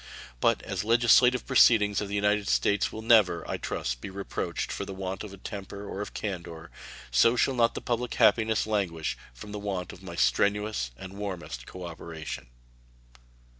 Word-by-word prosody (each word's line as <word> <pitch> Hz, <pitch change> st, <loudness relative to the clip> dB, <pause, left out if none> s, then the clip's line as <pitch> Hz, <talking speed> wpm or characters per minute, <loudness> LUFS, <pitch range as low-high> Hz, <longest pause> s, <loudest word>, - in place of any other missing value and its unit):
But -, -, +2 dB
as -, -, -3 dB
the 105 Hz, -, -8 dB
legislative 120 Hz, +2 st, +5 dB
proceedings 110 Hz, -6 st, +5 dB
of 105 Hz, -, -3 dB
the 100 Hz, -, -4 dB
United 105 Hz, 0 st, +1 dB
States 100 Hz, 0 st, +2 dB
will 110 Hz, -, -7 dB
never, 105 Hz, -7 st, +4 dB
I -, -, -2 dB
trust, -, -, -3 dB
be -, -, -6 dB
reproached 100 Hz, +1 st, -4 dB
for -, -, -3 dB
the 100 Hz, -1 st, -7 dB
want 95 Hz, 0 st, -4 dB
of 100 Hz, -2 st, -10 dB
temper 100 Hz, 0 st, -7 dB
or 100 Hz, -, -5 dB
of 105 Hz, -, -7 dB
candor, 85 Hz, -5 st, -5 dB, 0.4 s
so 90 Hz, -, +5 dB
shall 135 Hz, +2 st, +2 dB
not 120 Hz, -2 st, +2 dB
the -, -, -4 dB
public 120 Hz, 0 st, -2 dB
happiness 110 Hz, -1 st, +3 dB
languish 95 Hz, -7 st, -1 dB, 0.2 s
from 60 Hz, +13 st, -11 dB
the 105 Hz, -, -5 dB
want 95 Hz, -3 st, -4 dB
of 95 Hz, -, -13 dB
my 90 Hz, -3 st, -8 dB
strenuous 100 Hz, -, +1 dB
and 95 Hz, 0 st, -9 dB
warmest 90 Hz, -12 st, -5 dB
cooperation. 80 Hz, -6 st, -7 dB
100 Hz, 170 wpm, -28 LUFS, 85-110 Hz, 0.4 s, legislative